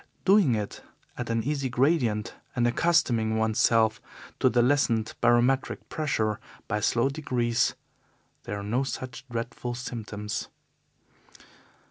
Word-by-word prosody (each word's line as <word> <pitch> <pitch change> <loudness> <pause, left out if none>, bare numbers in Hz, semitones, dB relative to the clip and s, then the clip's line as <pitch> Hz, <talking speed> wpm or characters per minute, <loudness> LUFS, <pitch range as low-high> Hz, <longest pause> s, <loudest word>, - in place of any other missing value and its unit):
Doing 190 - +5
it 105 -2 -4 0.3
at 125 -1 -5
an 115 -1 0
easy 140 0 -1
gradient 125 -5 +1 0.2
and 120 -2 +2
accustoming 120 -5 +2
oneself 110 0 +2 0.4
to - - +4
the 120 +1 +3
lessened 120 -4 +2
barometric 120 +3 +2
pressure 110 -9 -1 0.3
by 105 -2 -1
slow 120 +4 +2
degrees, 125 -5 0 0.7
there 105 - -4
are - - -6
no 115 +6 0
such 130 -2 -5
dreadful 120 +1 -4
symptoms. 110 -3 -5
120 Hz, 115 wpm, -27 LUFS, 110-130 Hz, 0.7 s, Doing